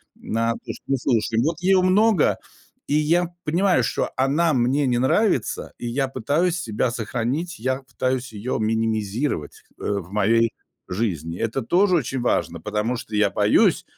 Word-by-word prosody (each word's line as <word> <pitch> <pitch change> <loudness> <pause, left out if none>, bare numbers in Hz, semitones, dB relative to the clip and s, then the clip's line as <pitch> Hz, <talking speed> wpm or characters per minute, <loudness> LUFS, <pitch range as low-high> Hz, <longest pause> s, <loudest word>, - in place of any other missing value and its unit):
на 115 +1 -1
то, - - -7
что 135 - -2
слушаем. 115 -2 +1
Вот 160 +3 -1
её 190 0 +4
много, 195 0 +3 0.5
и - - -1
я 165 +4 +2 0.2
понимаю, 180 +4 +2
что - - -1
она 150 +5 +2
мне 130 +3 +2
не 120 -1 +1
нравится 130 - +1
и 120 - -4
я 135 +3 0
пытаюсь 145 +8 0
себя 110 +2 -1
сохранить. 125 +9 -3
Я 130 +3 -1
пытаюсь 130 -1 -2
её 110 +5 -3
минимизировать, 110 - -1 0.2
э, - - -10 0.2
в 90 +1 -11
моей 115 +2 +3 0.4
жизни. 90 -5 -3
Это 115 +4 -1
тоже 185 - +3
очень 135 -4 -1
важно, 120 - 0
потому 115 +4 -1
что 110 - -7
я 105 -1 +3
боюсь, - - +3
125 Hz, 155 wpm, -23 LUFS, 110-155 Hz, 0.5 s, её